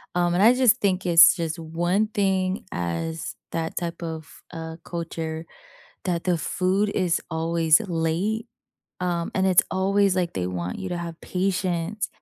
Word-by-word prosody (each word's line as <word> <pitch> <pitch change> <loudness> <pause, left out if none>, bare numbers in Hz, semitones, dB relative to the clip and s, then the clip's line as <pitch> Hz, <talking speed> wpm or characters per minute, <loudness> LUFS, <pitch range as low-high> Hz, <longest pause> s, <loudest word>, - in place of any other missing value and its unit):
um, 175 -1 +2
and 185 - +3
I 230 +3 +8
just 250 -2 +4
think 190 -2 +1
it's 170 -1 +8
just 165 -3 -3
one 175 +6 0
thing 190 -2 0
as 90 - -3 0.2
that 165 -1 -3
type 170 -1 -4
of, 160 -4 -7
uh, 160 0 -6
culture 165 -1 -5 0.6
that 175 -3 -1
the 180 -2 +2
food 190 +5 0
is 180 -4 +1
always 165 0 +3
late 185 +5 -1 0.5
um, 175 -2 -1
and 190 0 +2
it's 185 -2 +5
always 195 +1 +2
like 175 -2 0
they 90 -2 -1
want 90 -1 -4
you 190 - -4
to 175 - -2
have 170 -1 -6
patience, 185 +1 -1
175 Hz, 155 wpm, -24 LUFS, 165-190 Hz, 0.6 s, I